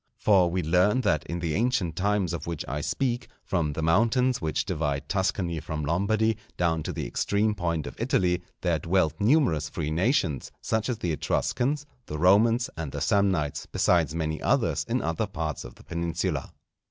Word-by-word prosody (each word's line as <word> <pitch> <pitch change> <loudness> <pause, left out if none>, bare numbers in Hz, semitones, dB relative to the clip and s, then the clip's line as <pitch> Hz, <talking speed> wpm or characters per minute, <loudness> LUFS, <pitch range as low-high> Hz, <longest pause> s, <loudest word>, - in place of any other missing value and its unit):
For 95 -4 +4
we 90 +1 -1
learn 90 +9 +3
that 85 - +1
in 85 - -3
the 85 -3 -1
ancient 110 -5 0
times 100 -2 0
of 80 -2 -5
which 85 -3 -4
I 70 +4 -3
speak, 125 - -1 0.2
from 80 -5 0
the 80 - -3
mountains 115 +9 +2
which 80 -2 -1
divide 70 -1 -2
Tuscany 95 -3 0
from 75 -1 -4
Lombardy 105 +7 +1 0.2
down 80 -2 +1
to - - -4
the - - -4
extreme 100 - +1
point 85 -5 -2
of - - -6
Italy, 90 -1 +1 0.2
there 85 -3 +1
dwelt 85 -3 +1
numerous 105 - +3
free 80 -2 -3
nations, 85 - 0
such 110 +1 -1
as 120 - -1
the 90 -6 -2
Etruscans, 140 - 0 0.2
the 75 - -4
Romans, 110 +8 +4
and 80 -4 -5
the - - -4
Samnites, 90 -8 +1
besides 80 -3 +2
many 80 -1 -2
others - - +1
in - - 0
other 80 +7 -1
parts 80 -7 -4
of - - -10
the - - -17
Peninsula. 85 -1 -2
85 Hz, 175 wpm, -27 LUFS, 80-105 Hz, 0.2 s, For